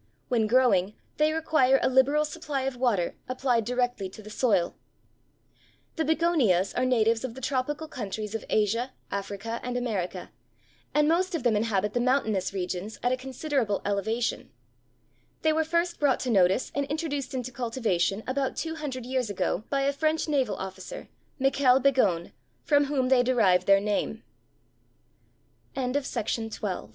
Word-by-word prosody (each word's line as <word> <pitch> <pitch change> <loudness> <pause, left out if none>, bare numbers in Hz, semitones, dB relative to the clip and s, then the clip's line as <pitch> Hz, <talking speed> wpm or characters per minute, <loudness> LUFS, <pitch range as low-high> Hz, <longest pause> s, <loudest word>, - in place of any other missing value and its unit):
When 230 -4 +2
growing, 215 -5 +3 0.2
they 305 +1 +3
require 310 -4 +3
a - - +1
liberal 275 +4 +3
supply 300 -3 -4
of 265 -1 -2
water, 240 -8 0
applied 255 -3 +1
directly 245 -4 -1
to 215 +3 -12
the 215 - -10
soil. 205 -7 +1 1.2
The 320 - 0
Begonias 300 - +2
are 255 - +1
natives 230 -2 +2
of 250 -3 -5
the - - -8
tropical 275 +4 -2
countries 215 -4 -5
of 225 - -3
Asia, 230 +5 +1 0.2
Africa, 200 +3 -4
and 245 0 -3
America, 195 -7 -3 0.6
and 300 0 +3
most 360 +3 +1
of 310 - -3
them 240 -3 +3
inhabit 210 -1 0
the 245 - +1
mountainous 240 -6 +1
regions 190 +2 -4
at 245 - +2
a - - +3
considerable 260 -4 -2
elevation. 220 +4 -1 0.9
They 315 0 +4
were 320 +1 +2
first 340 +2 0
brought 280 -3 +3
to 255 - -1
notice 190 +2 +3
and 280 0 -1
introduced 290 -3 -3
into 255 0 -3
cultivation 225 -5 -1
about 265 +1 -1
two 320 0 -3
hundred 265 -5 -5
years 255 -3 -1
ago 195 +1 -1
by 275 -1 +1
a 280 +1 +1
French 310 +3 0
naval 265 -9 +1
officer, 190 - -7 0.3
Michel 270 -1 +4
Begon, 230 -11 +2 0.3
from 290 -1 +3
whom 270 -3 0
they 260 -2 +5
derived 225 -8 +3
their 195 0 +6
name. 210 +2 -2 1.5
GLOXINIA. 230 - -2
250 Hz, 150 wpm, -27 LUFS, 210-275 Hz, 1.5 s, their